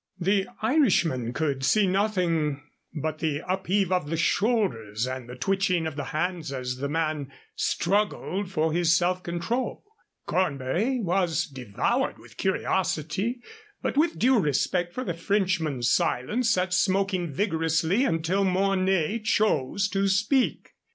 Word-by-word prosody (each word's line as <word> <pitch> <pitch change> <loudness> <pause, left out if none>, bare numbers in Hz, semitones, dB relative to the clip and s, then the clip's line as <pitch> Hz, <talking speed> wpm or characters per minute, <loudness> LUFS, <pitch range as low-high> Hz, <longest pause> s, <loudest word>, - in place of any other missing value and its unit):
The 195 +2 +1 0.2
Irishman 180 - +2
could 140 -1 -1
see 205 +10 +4
nothing 180 -7 0 0.3
but 155 0 -4
the 155 -1 -1
upheave 190 0 0
of 180 -5 0
the 165 - -1
shoulders 135 - 0
and 130 -1 -5
the 125 - -7
twitching 190 +2 0
of 160 -2 -4
the 145 -2 -4
hands 170 +1 -2
as 125 -2 -3
the 140 +2 -3
man 155 -3 -2 0.2
straggled 200 +1 0
for 160 -3 0
his 170 0 +3
self 180 +1 +1
control. 180 +9 -3 0.4
Cornbury 185 - 0
was 175 -5 +1
devoured 125 -8 -2
with - - -17
curiosity, 190 - -1 0.4
but - - -1
with 320 +3 +2
due 255 0 +4
respect 175 +2 0
for 255 - -4
the 175 - -2
Frenchman's 165 -8 0
silence 225 - +1
sat 185 -4 +1
smoking 185 -2 +1
vigorously 165 - +1
until 185 -3 +1
Mornay 190 0 +1
chose 205 - +1
to 195 0 +1
speak. 205 +7 +1
180 Hz, 130 wpm, -26 LUFS, 155-200 Hz, 0.4 s, see